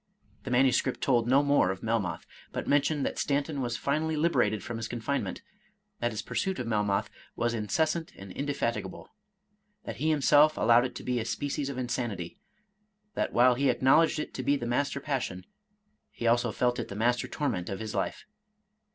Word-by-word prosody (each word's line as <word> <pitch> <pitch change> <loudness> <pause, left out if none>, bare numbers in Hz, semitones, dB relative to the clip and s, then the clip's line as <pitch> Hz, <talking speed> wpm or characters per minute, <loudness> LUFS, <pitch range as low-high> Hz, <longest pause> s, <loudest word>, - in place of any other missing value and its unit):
The - - -4
manuscript 130 +1 +2
told 120 -3 +2
no 135 +3 +4
more 140 -10 +3
of 95 0 -4
Melmoth, 110 -5 -1 0.3
but - - -4
mentioned 145 0 +2
that - - -3
Stanton 145 0 -1
was 120 -2 -2
finally 155 +3 0
liberated 125 - +1
from 120 +3 -5
his 115 0 -4
confinement, 120 +5 -3 0.3
— 210 0 -42
^that 120 - +1
his 110 0 -5
pursuit 190 +9 -2
of 125 - -3
Melmoth 105 -3 0 0.2
was 120 0 0
incessant 155 - -1
and 95 -1 -10
indefatigable, 115 -7 -3 0.4
— 210 +1 -36
^that - - -5
he 155 - 0
himself 150 0 +5
allowed 120 +2 +5
it 130 - -5
to - - -7
be 125 -1 -1
a - - -2
species 140 +4 -2
of 140 - -5
insanity, 120 -8 -3 0.4
— 210 0 -46
that - - -1
while 125 +1 +5
he 135 +3 +1
acknowledged 155 +6 +4
it 150 - -4
to - - -4
be 140 +3 +2
the 120 - -4
mas 125 +4 +1
ter 140 - -4
passion, 125 -11 -3 0.6
he 120 - -7
also 120 0 +3
felt 125 +3 0
it - - -3
the 100 - -7
master 120 +3 +1
torment 125 - -2
of 95 - -4
his 110 -1 -5
life. - - -3
130 Hz, 195 wpm, -29 LUFS, 115-145 Hz, 0.6 s, himself